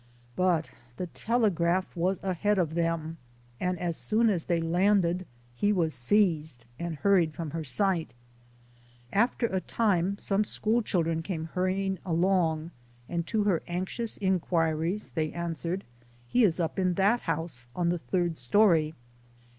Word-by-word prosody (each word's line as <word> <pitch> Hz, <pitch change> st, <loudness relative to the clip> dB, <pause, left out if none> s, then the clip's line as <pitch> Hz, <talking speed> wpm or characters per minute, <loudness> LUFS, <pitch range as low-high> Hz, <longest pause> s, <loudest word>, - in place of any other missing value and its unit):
But 180 Hz, -3 st, +1 dB, 0.3 s
the 180 Hz, -, -2 dB
telegraph 185 Hz, -3 st, 0 dB
was 180 Hz, +2 st, 0 dB
ahead 195 Hz, +2 st, +1 dB
of 165 Hz, -4 st, +1 dB
them, 165 Hz, -1 st, -1 dB, 0.4 s
and 180 Hz, 0 st, -1 dB
as 170 Hz, -1 st, -2 dB
soon 220 Hz, +4 st, +2 dB
as 175 Hz, -5 st, -2 dB
they 170 Hz, -2 st, +1 dB
landed 180 Hz, +1 st, +2 dB, 0.3 s
he 205 Hz, +12 st, +1 dB
was 170 Hz, -6 st, +1 dB
seized 155 Hz, -, +1 dB
and 170 Hz, -1 st, -3 dB
hurried 170 Hz, -2 st, +2 dB
from 165 Hz, -3 st, -5 dB
her 165 Hz, +1 st, -3 dB
sight. 170 Hz, -, 0 dB, 1.0 s
After 235 Hz, +3 st, +2 dB
a 190 Hz, -4 st, -1 dB
time, 200 Hz, -4 st, +1 dB
some 200 Hz, +1 st, +1 dB
school 220 Hz, +2 st, +1 dB
children 165 Hz, -6 st, 0 dB
came 165 Hz, -2 st, -4 dB
hurrying 190 Hz, +1 st, 0 dB
along, 170 Hz, -2 st, +1 dB, 0.4 s
and 170 Hz, -1 st, -3 dB
to 220 Hz, -2 st, +1 dB
her 195 Hz, -5 st, +2 dB
anxious 185 Hz, +6 st, -3 dB
inquiries 175 Hz, -1 st, 0 dB
they 155 Hz, -2 st, -1 dB
answered, 170 Hz, +2 st, -3 dB, 0.2 s
" 120 Hz, 0 st, -30 dB
He 250 Hz, -, +5 dB
is 175 Hz, -3 st, +1 dB
up 165 Hz, +2 st, -1 dB
in 185 Hz, -2 st, +1 dB
that 205 Hz, +6 st, +3 dB
house, 160 Hz, -, -3 dB
in 175 Hz, -1 st, +1 dB
the 175 Hz, 0 st, 0 dB
third 175 Hz, -1 st, -1 dB
story." 160 Hz, -, +3 dB
175 Hz, 145 wpm, -28 LUFS, 165-195 Hz, 1.0 s, He